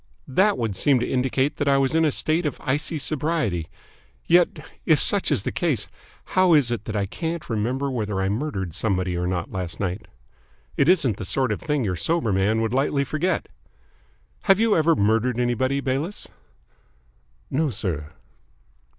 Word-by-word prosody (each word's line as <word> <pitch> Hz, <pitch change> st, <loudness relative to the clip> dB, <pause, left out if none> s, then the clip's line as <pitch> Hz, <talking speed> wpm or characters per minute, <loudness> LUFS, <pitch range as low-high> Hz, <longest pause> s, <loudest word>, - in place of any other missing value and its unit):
"That 195 Hz, +10 st, +3 dB
would 110 Hz, -4 st, -2 dB
seem 130 Hz, +6 st, +3 dB
to 120 Hz, -, -1 dB
indicate 130 Hz, +2 st, 0 dB
that 145 Hz, -, -1 dB
I 140 Hz, 0 st, +4 dB
was 135 Hz, 0 st, +1 dB
in 160 Hz, 0 st, +3 dB
a 150 Hz, -, +2 dB
state 155 Hz, +4 st, 0 dB
of 145 Hz, -, -4 dB
icy 150 Hz, +3 st, -1 dB
sobriety. 145 Hz, -, -1 dB, 0.6 s
Yet, 175 Hz, 0 st, +3 dB, 0.2 s
if -, -, +4 dB
such -, -, +1 dB
is -, -, +1 dB
the -, -, -2 dB
case, -, -, 0 dB, 0.5 s
how 185 Hz, -3 st, +5 dB
is 135 Hz, -5 st, +3 dB
it 115 Hz, -3 st, -3 dB
that 110 Hz, -, -4 dB
I 100 Hz, -1 st, 0 dB
can't 165 Hz, -, -4 dB
remember 125 Hz, +6 st, -1 dB
whether 105 Hz, -5 st, -2 dB
I 95 Hz, -, 0 dB
murdered 100 Hz, -, -3 dB
somebody 95 Hz, -2 st, -1 dB
or 90 Hz, 0 st, -1 dB
not 90 Hz, -2 st, -3 dB
last 90 Hz, -3 st, -4 dB
night? 95 Hz, +2 st, -3 dB, 0.7 s
It 140 Hz, -, +3 dB
isn't 145 Hz, -, +3 dB
the -, -, -5 dB
sort 130 Hz, +5 st, 0 dB
of 105 Hz, -, -3 dB
thing 150 Hz, -3 st, 0 dB
your 95 Hz, -4 st, -1 dB
sober 155 Hz, -, 0 dB
man 105 Hz, +4 st, +2 dB
would 115 Hz, 0 st, -1 dB
lightly 140 Hz, +1 st, +1 dB
forget. 155 Hz, +6 st, -1 dB, 1.0 s
Have 195 Hz, 0 st, +5 dB
you 225 Hz, -2 st, +3 dB
ever 160 Hz, 0 st, +3 dB
murdered 115 Hz, +2 st, +1 dB
anybody, 130 Hz, +3 st, 0 dB
Bayliss?" 140 Hz, +9 st, -2 dB, 1.2 s
"No, 150 Hz, +3 st, +1 dB
sir." 90 Hz, -, -3 dB
130 Hz, 175 wpm, -24 LUFS, 105-155 Hz, 1.2 s, how